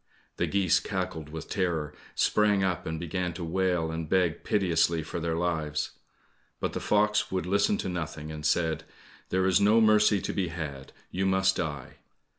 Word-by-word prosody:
The - - 0
geese 95 -2 +3
cackled 90 -7 -4
with 80 +1 -7
terror, 85 -6 -1 0.2
sprang 105 -2 +3
up, 90 -3 -1
and 80 0 -3
began 90 +1 -2
to 85 +1 -6
wail 90 -1 0
and 80 -1 -4
beg 90 -3 +1
piteously 85 -4 +2
for 80 - -5
their 80 0 -1
lives. 80 -3 -1 0.7
But - - -2
the - - -2
fox 105 0 +2
would 95 -2 -1
listen 100 +2 +2
to - - -3
nothing, 80 -3 -4
and 75 -1 -7
said, 80 0 +1 0.5
"There 95 0 +1
is 95 +1 +4
no 105 +3 +5
mercy 105 -2 +5
to - - -3
be 95 -3 0
had! 75 -5 -6 0.2
You 95 +1 0
must 95 0 +3
die." 75 -6 -4
90 Hz, 175 wpm, -28 LUFS, 80-95 Hz, 0.7 s, no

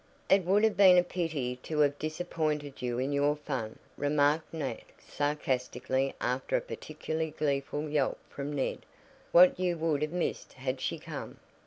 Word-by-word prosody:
"It 195 -1 +6
would 200 +4 +3
have 220 -2 +3
been 190 -2 +8
a 180 - +6
pity 155 -9 -2
to 150 +4 -1
have 145 -1 +2
disappointed 155 -3 -2
you 120 -1 -1
in 130 +3 -1
your 145 +1 +2
fun," 135 -7 -4 0.2
remarked 145 +2 +2
Nat 160 -2 -4 0.2
sarcastically 135 -2 -1
after 125 +2 -1
a - - -1
particularly 160 +1 -4
gleeful 145 +1 -1
yelp 145 -3 +1
from 140 +1 -5
Ned. 140 -2 -1 0.5
"What 180 +1 +7
you 180 -2 0
would 160 -3 0
have 150 0 -1
missed 180 0 -3
had 130 0 -3
she - - -1
come!" - - -7
150 Hz, 160 wpm, -30 LUFS, 135-160 Hz, 0.5 s, been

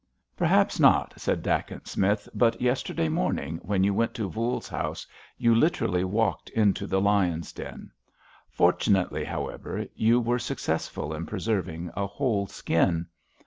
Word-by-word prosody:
"Perhaps - - +2
not," - - +5
said - - -2
Dacent - - -2
Smith, 100 +2 0
"but 115 -1 +2
yesterday 125 -9 0
morning, 80 +2 -1
when 95 0 0
you 100 +1 +3
went 115 +3 0
to 110 -3 -2
Voules's 115 +2 -2
house, - - -4 0.3
you 115 -1 +4
literally 115 - +2
walked 105 +3 0
into 105 -2 +1
the 95 - +1
lions' 95 -5 +1
den. - - -9 0.6
Fortunately, 90 +2 +2
however, - - -4
you 115 +2 +3
were 120 +1 0
successful 75 -8 -3
in 80 +1 -5
preserving 90 -5 -2
a 100 -1 -1
whole 105 -3 -1
skin." 85 -1 +1
100 Hz, 140 wpm, -27 LUFS, 90-115 Hz, 0.6 s, not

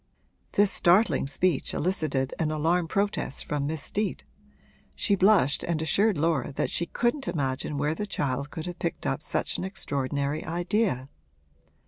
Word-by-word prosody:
This 205 -1 +4
startling 175 -6 +3
speech 150 +1 0
elicited 150 -7 0
an 160 - +1
alarmed 165 +2 +1
protest 200 -8 0
from 145 -1 -1
Miss 155 -2 -3
Steet; 210 0 -2 0.7
she 205 - +2
blushed 190 -7 +4
and 170 -2 -1
assured 195 +6 +2
Laura 155 -4 +1
that - - -1
she 170 - -1
couldn't 240 - 0
imagine 140 -3 -2
where 145 +2 +1
the 210 +6 -4
child 140 -5 -2
could 160 0 -6
have 175 -1 -6
picked 170 - -3
up 70 - -1
such - - -1
an - - -3
extraordinary 140 -4 -2
idea. 175 - 0
160 Hz, 150 wpm, -27 LUFS, 140-190 Hz, 0.7 s, This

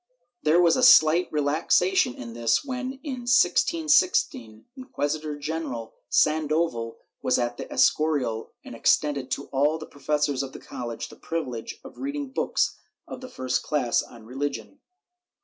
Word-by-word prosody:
There 155 +3 +3
was 170 -2 +5
a - - 0
slight 170 -7 +6
relaxation 150 +1 +2
in 115 -1 -8
this 115 - +1
when, 260 -1 -4
in 255 -5 -6
1616, 185 - +2
Inquisitor 155 - -3
general 145 -6 -5 0.2
Sandoval 155 -6 +1 0.2
was - - +2
at 120 0 -2
the - - -8
Escorial 140 -8 +1
and - - -9
extended 140 +3 +1
to - - -3
all 145 +3 +1
the 155 - -8
pro 145 - -18
fessors 145 -1 0
of 135 -1 -6
the - - -9
college 120 -2 -6
the - - -13
privilege 130 -9 -5
of - - -13
reading 280 0 -4
books - - 0 0.3
of 255 - -8
the 255 - -8
first 130 -1 -2
class 135 -6 0
on 115 -2 -13
religion. 145 - -5
150 Hz, 150 wpm, -25 LUFS, 125-180 Hz, 0.3 s, slight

